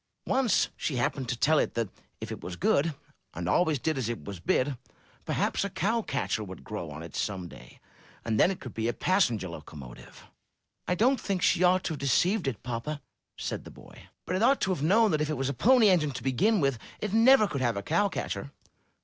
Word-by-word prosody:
Once 260 -4 +2
she 145 - -3
happened 125 +1 -1
to 125 - -1
tell 155 +5 +3
it - - -1
that 115 -2 0 0.3
if - - -6
it - - -6
was 90 - -6
good 145 - +1 0.4
and 90 +1 -4
always 155 - +2
did 155 +3 -1
what 120 -4 -2
it 120 - -5
was 100 -3 -7
bid, 130 +10 +1 0.5
perhaps - - 0
a 200 - -2
cow 220 +5 0
catcher 135 - -2
would 95 -2 -9
grow - - -6
on - - -8
it - - -10
some 95 -4 -3
day, 60 -6 -14 0.5
and 110 -1 0
then - - +6
it 190 - -4
could 125 - -9
be 115 0 -2
a 120 - 0
passenger 120 - +1
locomotive/' 75 -6 -11 0.6
'1 180 - 0
don't 255 +6 +3
think 190 -4 -2
she - - +3
ought 180 +1 +4
to 160 - -2
have 150 - -7
deceived 175 - +2
it, 120 -6 -3
papa," 125 +5 -4 0.4
said - - -4
the - - -11
boy. - - -15 0.2
'*But 180 - -2
it - - -2
ought 265 +4 +4
to 190 - +1
have 170 - -5
known 210 +7 +4
that 155 -1 +1
if 150 - 0
it 155 - -1
was 135 +1 -1
a - - -1
Pony 230 - +5
Engine 165 -5 +3
to - - -7
begin 195 - +2
with, 135 -6 +1 0.2
it 210 -2 -3
never 225 0 +6
could 140 -7 -3
have 120 -4 +1
a 100 - -3
cow 170 - +2
catcher." 100 - -4
145 Hz, 225 wpm, -28 LUFS, 115-190 Hz, 0.6 s, then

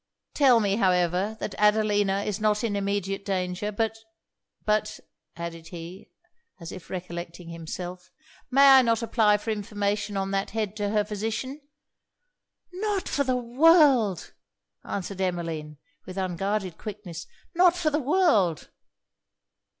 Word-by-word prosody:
Tell 260 -5 +5
me, 200 -2 +1
however, 185 +1 +1
that 200 - -4
Adelina 205 -2 +2
is 210 0 -3
not 210 +1 +1
in 215 -3 -1
immediate 200 -1 -2
danger. 185 +1 -2
But, 225 +1 -2 0.7
but' 215 0 0 0.4
added 165 -1 -7
he, 175 +2 -9 0.5
as 170 -1 -8
if 185 - -10
recollecting 175 -1 -7
himself, 175 +2 -7 0.4
'may 275 +2 +6
I 265 -1 +9
not 230 -1 +1
apply 215 -3 +3
for 220 +2 -4
information 205 0 -2
on 195 0 -2
that 195 0 -1
head 215 -2 -2
to 205 -1 -1
her 210 0 +1
physician?' 225 +7 -4 1.1
'Not 400 0 -2
for 280 - 0
the 255 -2 0
world!' 255 - +4 0.5
answered 195 0 -5
Emmeline, 165 -5 -3 0.3
with 185 +1 -8
unguarded 190 0 -2
quickness 195 -6 -7 0.3
'not 355 0 +5
for 320 -3 +1
the 300 - +1
world!' 260 - +2
205 Hz, 130 wpm, -26 LUFS, 180-225 Hz, 1.1 s, I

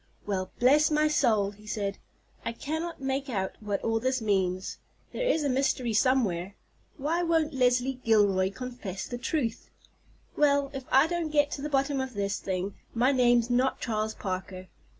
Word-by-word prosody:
"Well, 190 -2 -2
bless 290 +5 +5
my 305 0 +3
soul!" 225 -9 +2
he 210 +1 -17
said; 200 -2 -3 0.4
"I - - -3
cannot 315 +4 -4
make 270 +1 -2
out 190 -5 -1
what 205 -2 -3
all 225 0 +1
this 260 +2 0
means. 190 -4 -1 0.3
There - - -1
is 325 -11 +2
a - - +1
mystery 255 -3 0
somewhere. 205 -7 +1 0.4
Why 315 +5 0
won't 325 -3 +1
Leslie 250 0 +2
Gilroy 200 -4 +3
confess 210 -3 -6
the 245 - -6
truth? 250 -3 -2 0.7
Well, 285 -1 +3
if 270 -2 -6
I 270 - +6
don't 340 -1 -2
get 290 -1 +2
to 280 - -4
the 300 - -3
bottom 275 -1 +1
of 260 -3 -5
this 200 0 -1
thing 190 +1 -3 0.2
my 250 +4 +3
name's 240 -2 +3
not 255 +2 +2
Charles 215 -1 -2
Parker. 185 -1 -5
250 Hz, 170 wpm, -28 LUFS, 205-280 Hz, 0.7 s, I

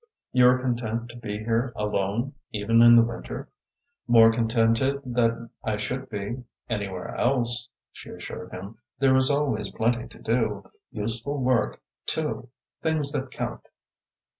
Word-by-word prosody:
"You 125 -1 +6
are 125 +1 +6
content 120 -2 -2
to 120 - -10
be 105 -3 -5
here 115 +3 0
alone, 105 +5 -1 0.2
even 110 +2 +3
in 120 0 +9
the 115 - +8
winter?" 115 0 -5 0.6
"More 115 -2 +7
contented 115 +3 +2
than 115 -2 0
I 110 -1 -1
should 130 +5 -4
be 110 +3 -4 0.2
anywhere 100 -5 -4
else," 120 -1 +1 0.2
she - - -12
assured - - -8
him. 100 +4 -8 0.2
"There 135 -1 +4
is 130 +1 +5
always 140 -6 0
plenty 120 +1 0
to - - -16
do, 110 -4 -1 0.2
useful 115 +5 -3
work, 125 -4 +1 0.2
too - - -2 0.3
things 155 -3 +1
that 130 -1 -3
count." - - -4
115 Hz, 140 wpm, -26 LUFS, 110-125 Hz, 0.6 s, in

